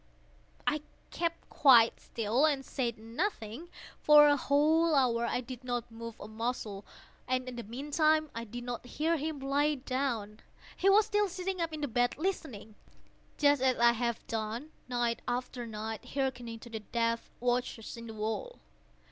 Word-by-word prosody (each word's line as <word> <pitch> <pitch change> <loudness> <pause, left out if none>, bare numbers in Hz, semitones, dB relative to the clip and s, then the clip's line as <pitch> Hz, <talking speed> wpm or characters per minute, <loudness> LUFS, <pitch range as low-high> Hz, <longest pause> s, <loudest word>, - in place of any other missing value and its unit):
I 300 0 +1 0.3
kept 335 -1 -2
quite 240 -5 +6
still 230 +5 +1
and 275 -3 0
said 240 -4 -2
nothing. 230 - -4 0.3
For 300 0 +8
a 290 - +5
whole 310 +3 +3
hour 235 -3 +2
I - - -1
did 255 0 -9
not 245 -2 -3
move 230 0 -8
a - - -8
muscle, 220 -2 -4 0.4
and 255 0 0
in 250 - -5
the 240 - -4
meantime 300 - +1
I 230 0 -5
did 240 +2 -7
not 240 -1 -5
hear 310 +6 0
him 305 0 -3
lie 285 +2 +1
down. 255 -6 -2 0.4
He 390 - +3
was 415 +2 +6
still 415 -1 +2
sitting 370 0 -3
up 330 -1 -1
in 310 -1 -6
the 290 - 0
bed 245 0 +1
listening;—just 285 - -2
as 260 -1 +3
I 235 0 +6
have 235 0 -2
done, 225 +6 -4 0.2
night 240 -1 0
after 245 0 -3
night, 220 0 -5
hearkening 245 -4 -2
to 240 - -10
the 220 - -4
death 230 +1 -1
watches 245 -2 -1
in 230 0 -9
the 225 - -8
wall. 220 - -3
250 Hz, 165 wpm, -31 LUFS, 230-295 Hz, 0.4 s, For